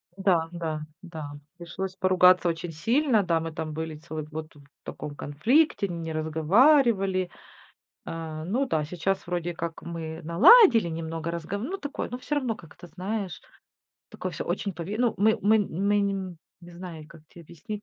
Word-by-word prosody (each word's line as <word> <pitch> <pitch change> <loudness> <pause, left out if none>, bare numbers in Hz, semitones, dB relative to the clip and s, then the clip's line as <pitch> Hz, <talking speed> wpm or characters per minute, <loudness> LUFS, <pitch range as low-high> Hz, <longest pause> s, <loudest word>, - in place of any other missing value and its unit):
Да 180 -4 +2
да 160 -3 -4 0.2
да. 160 -5 -7 0.3
Пришлось 185 +2 -5
поругаться 185 -1 +5
очень 165 +1 -4
сильно. 230 - +2
Да, 165 -2 +1
мы 165 0 -4
там 155 0 -5
были 160 0 -4
целый 155 0 -6
год 155 +1 -8
вот 145 - -16
в - - -27
таком 145 -1 -7
конфликте, 200 - +2
не 165 -2 -5
разговаривали. 190 - +3 0.8
А, 160 -1 -6
ну 245 +10 0
да, 155 -10 0
сейчас 180 +5 -2
вроде 175 -1 -2
как 165 0 -5
мы 165 -1 -6
наладили 225 - +7
немного, 165 0 -4
разга 170 +4 -4
ну, 330 - -4
такое, 285 -5 -5
но 245 - -4
всё 295 - -3
равно 255 -6 -1
как-то, 175 0 -14
знаешь, 190 +3 -4 0.7
такое - - -5
всё - - -5
очень 200 - -2
пове 175 +5 -5
ну. 245 -2 +2
Мы 220 +2 +4
мы 215 +2 +5
мы 200 +1 +1
не 200 0 +1
м, 185 -3 -6 0.2
не 175 0 -13
знаю, 170 -3 -8
как 165 -2 -15
те 175 - -14
объяснить, 170 +6 -8
175 Hz, 170 wpm, -27 LUFS, 160-205 Hz, 0.8 s, наладили